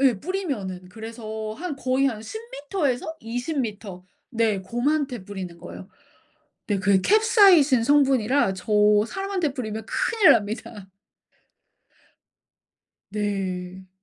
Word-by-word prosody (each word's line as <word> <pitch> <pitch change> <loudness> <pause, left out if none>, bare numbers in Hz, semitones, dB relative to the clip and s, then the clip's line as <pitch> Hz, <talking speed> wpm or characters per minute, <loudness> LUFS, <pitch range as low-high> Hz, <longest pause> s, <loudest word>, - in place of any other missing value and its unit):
예. 255 -7 +3
뿌리면은. 250 - -4
그래서 220 +1 -7
한 320 +1 -5
거의 265 0 +1
한 225 -5 -2
10m 355 - -4
에서 260 +6 -3
20m 225 - -4 0.3
네 225 -4 +1
곰한테 245 +3 -1
뿌리는 185 -3 -7
거예요. 185 - -10 0.8
네 205 -2 0
그게 195 -1 +3
캡사이신 385 - +5
성분이라 270 -5 +3
저 180 -1 -10 0.4
사람한테 380 - -2
뿌리면 220 -4 -5
큰일납니다. 225 - +1 2.3
네. 190 -3 -4
230 Hz, 220 characters per minute, -24 LUFS, 205-290 Hz, 2.3 s, 캡사이신